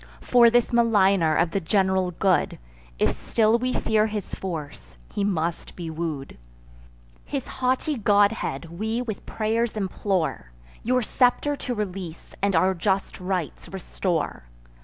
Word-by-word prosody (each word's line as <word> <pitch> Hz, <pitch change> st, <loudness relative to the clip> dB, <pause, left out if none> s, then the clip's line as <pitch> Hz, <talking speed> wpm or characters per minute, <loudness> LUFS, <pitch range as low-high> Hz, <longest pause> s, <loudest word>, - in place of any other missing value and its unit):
For 240 Hz, -1 st, +5 dB
this 240 Hz, +1 st, +2 dB
maligner 195 Hz, -8 st, +4 dB
of 165 Hz, +1 st, +2 dB
the 195 Hz, -, 0 dB
general 190 Hz, +1 st, +1 dB
good, 185 Hz, +1 st, +1 dB, 0.4 s
If -, -, +2 dB
still 225 Hz, +1 st, +2 dB
we 255 Hz, +1 st, -1 dB
fear 220 Hz, -3 st, +2 dB
his 210 Hz, -2 st, -5 dB
force, 145 Hz, -, -6 dB, 0.2 s
he 205 Hz, -, -1 dB
must 170 Hz, -4 st, -2 dB
be 170 Hz, -3 st, -5 dB
woo'd; 155 Hz, -, -5 dB, 0.8 s
His -, -, -4 dB
haughty 260 Hz, +3 st, -1 dB
godhead 200 Hz, -6 st, +1 dB
we 220 Hz, +3 st, -1 dB
with 220 Hz, -4 st, -5 dB
pray'rs 225 Hz, +1 st, -1 dB
implore, 185 Hz, -, -2 dB, 0.3 s
Your 250 Hz, +2 st, +1 dB
scepter 255 Hz, +5 st, +2 dB
to 250 Hz, -3 st, -3 dB
release, 185 Hz, -5 st, -5 dB
and 200 Hz, -1 st, +2 dB
our 185 Hz, +4 st, +4 dB
just 190 Hz, +2 st, -1 dB
rights 180 Hz, -3 st, -3 dB
restore. 180 Hz, -, -3 dB
195 Hz, 135 wpm, -25 LUFS, 170-225 Hz, 0.8 s, For